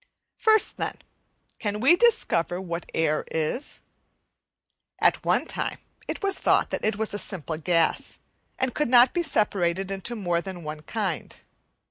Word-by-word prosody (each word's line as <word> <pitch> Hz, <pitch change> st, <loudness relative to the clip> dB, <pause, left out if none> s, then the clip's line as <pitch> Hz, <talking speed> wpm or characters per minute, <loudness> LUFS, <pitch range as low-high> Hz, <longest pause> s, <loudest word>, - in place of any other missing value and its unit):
First, 435 Hz, -1 st, +3 dB
then, -, -, -3 dB, 0.6 s
can 210 Hz, -1 st, -2 dB
we 265 Hz, +9 st, +6 dB
discover 355 Hz, -, +2 dB
what 175 Hz, -2 st, -5 dB
air 155 Hz, -1 st, +1 dB
is? 160 Hz, -, -2 dB, 1.2 s
At -, -, +2 dB
one -, -, +2 dB
time -, -, -3 dB, 0.3 s
it -, -, -5 dB
was 395 Hz, -1 st, +1 dB
thought -, -, +2 dB
that -, -, -3 dB
it 215 Hz, -, +1 dB
was 220 Hz, 0 st, -2 dB
a 205 Hz, -, -2 dB
simple 165 Hz, -6 st, -3 dB
gas 165 Hz, +1 st, +1 dB, 0.4 s
and 260 Hz, -2 st, -1 dB
could 300 Hz, -4 st, 0 dB
not 245 Hz, +1 st, +6 dB
be 350 Hz, -, +1 dB
separated 195 Hz, -, 0 dB
into 195 Hz, +5 st, -3 dB
more 175 Hz, -5 st, 0 dB
than 185 Hz, -2 st, -8 dB
one 155 Hz, 0 st, -6 dB
kind. 190 Hz, 0 st, -3 dB
195 Hz, 150 wpm, -26 LUFS, 170-245 Hz, 1.2 s, we